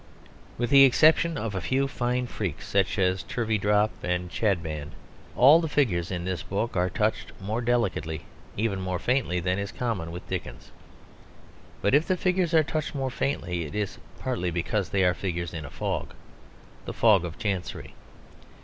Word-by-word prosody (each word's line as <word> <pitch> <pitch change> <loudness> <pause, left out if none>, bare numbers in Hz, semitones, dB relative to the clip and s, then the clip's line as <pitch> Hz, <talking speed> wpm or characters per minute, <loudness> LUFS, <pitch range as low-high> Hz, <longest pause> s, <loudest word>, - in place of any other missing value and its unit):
With 120 0 -1
the 140 -1 +9
exception 155 +4 +5
of 115 -5 -3
a 95 - -2
few 135 +1 +1
fine 125 -1 -1
freaks, 105 -9 -4
such 95 -1 +1
as 95 -1 +2
Turveydrop 105 0 +1
and 90 0 -2
Chadband, 80 -7 -1 0.4
all 145 +7 +7
the 160 - -2
figures 95 - +1
in 90 -2 -3
this 90 -4 -2
book 100 +4 -3
are 90 0 +2
touched 105 +4 -1
more 105 +4 -2
delicately, 95 -11 -1 0.3
even 100 -3 0
more 95 -1 -2
faintly, 120 -4 0
than 90 +2 0
is 100 0 -4
common 110 -10 -3
with 85 +2 -8
Dickens. - - -6 1.1
But - - +2
if 150 +3 +4
the 185 - +1
figures 180 -2 +1
are 160 - +6
touched 155 0 -3
more 135 -2 -2
faintly, 90 -12 -2
it 75 -1 -7
is 105 -2 -3 0.2
partly 120 -9 -2
because 95 +4 -1
they 95 -1 +2
are 90 -1 +4
figures 85 -3 -4
in 80 -3 -5
a - - -8
fog - - -4 0.7
the - - -5
fog 105 -6 +4
of 85 -2 -6
Chancery. 95 -4 -4
100 Hz, 170 wpm, -27 LUFS, 90-125 Hz, 1.1 s, the